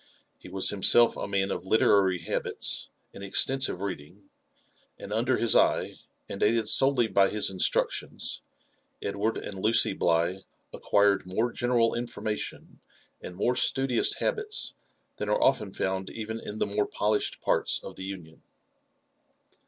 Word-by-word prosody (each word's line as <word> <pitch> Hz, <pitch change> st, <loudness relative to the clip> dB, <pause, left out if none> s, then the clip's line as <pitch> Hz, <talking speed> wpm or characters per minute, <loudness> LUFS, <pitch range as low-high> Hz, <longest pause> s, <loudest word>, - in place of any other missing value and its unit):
He -, -, -12 dB
was 95 Hz, 0 st, +1 dB
himself 115 Hz, +4 st, +4 dB
a -, -, -5 dB
man 100 Hz, -1 st, -1 dB
of -, -, -5 dB
literary 100 Hz, -3 st, +3 dB
habits -, -, -2 dB, 0.2 s
and 100 Hz, -, -10 dB
extensive 130 Hz, +1 st, +2 dB
reading; 95 Hz, +1 st, -7 dB, 0.7 s
aiid 100 Hz, -, -7 dB
under 120 Hz, +3 st, +1 dB
his 115 Hz, -, +2 dB
eye, -, -, +2 dB, 0.3 s
and 100 Hz, -, -7 dB
aided 110 Hz, 0 st, +2 dB
solely 135 Hz, 0 st, +4 dB
by 95 Hz, -1 st, +3 dB
his 105 Hz, -2 st, 0 dB
instructions, 95 Hz, -1 st, -1 dB, 0.6 s
Edward 100 Hz, +3 st, -1 dB
and 95 Hz, -2 st, -7 dB
Lucy 110 Hz, -2 st, +4 dB
Bligh 85 Hz, +1 st, 0 dB, 0.3 s
acquired 100 Hz, -2 st, +1 dB
more 110 Hz, +6 st, -1 dB
general 120 Hz, -2 st, +1 dB
information 115 Hz, -3 st, -5 dB, 0.4 s
and 90 Hz, -, -9 dB
more 120 Hz, +6 st, 0 dB
studious 130 Hz, -1 st, +1 dB
habits 430 Hz, 0 st, -2 dB, 0.4 s
than -, -, -4 dB
are -, -, +1 dB
often 100 Hz, -, +1 dB
found 95 Hz, 0 st, -3 dB
even 110 Hz, 0 st, -6 dB
in 105 Hz, -, -7 dB
the -, -, 0 dB
more 105 Hz, 0 st, -1 dB
polished 105 Hz, 0 st, -1 dB
parts -, -, +2 dB
of -, -, -9 dB
the 95 Hz, -, -8 dB
Union. 90 Hz, -5 st, -9 dB
105 Hz, 140 wpm, -27 LUFS, 95-115 Hz, 0.7 s, himself